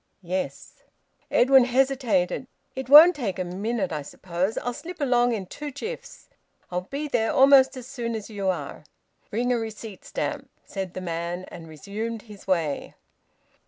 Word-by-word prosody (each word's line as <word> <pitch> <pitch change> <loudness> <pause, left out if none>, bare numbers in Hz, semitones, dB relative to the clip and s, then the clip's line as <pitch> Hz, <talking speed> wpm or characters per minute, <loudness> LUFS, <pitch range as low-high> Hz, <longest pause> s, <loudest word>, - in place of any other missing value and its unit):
"Yes." 185 +2 -4 0.5
Edwin 265 -2 +6
hesitated. 255 -5 +1 0.3
"It 260 -1 -5
won't 315 +5 +10
take 210 -10 -3
a 185 - -1
minute, 195 +2 -2
I 155 -2 -2
suppose. 180 +7 -3
I'll 245 - -2
slip 345 +8 -8
along 245 -3 +3
in 200 -4 -3
two 295 +10 -7
jiffs. 475 - -8 0.4
I'll 180 +1 -3
be 290 +2 -3
there 230 -5 +1
almost 270 -1 +6
as 250 - -8
soon 240 -3 -4
as 215 -2 -5
you 200 -3 -4
are." 185 - -3 0.5
"Bring 245 +3 0
a 240 - +1
receipt 220 -3 -7
stamp," - - -4 0.2
said 190 -2 -5
the 185 - -4
man, 170 +1 -4
and 170 -1 -9
resumed 210 +8 -5
his 210 -4 -14
way. 165 -6 -1
225 Hz, 160 wpm, -25 LUFS, 185-260 Hz, 0.5 s, won't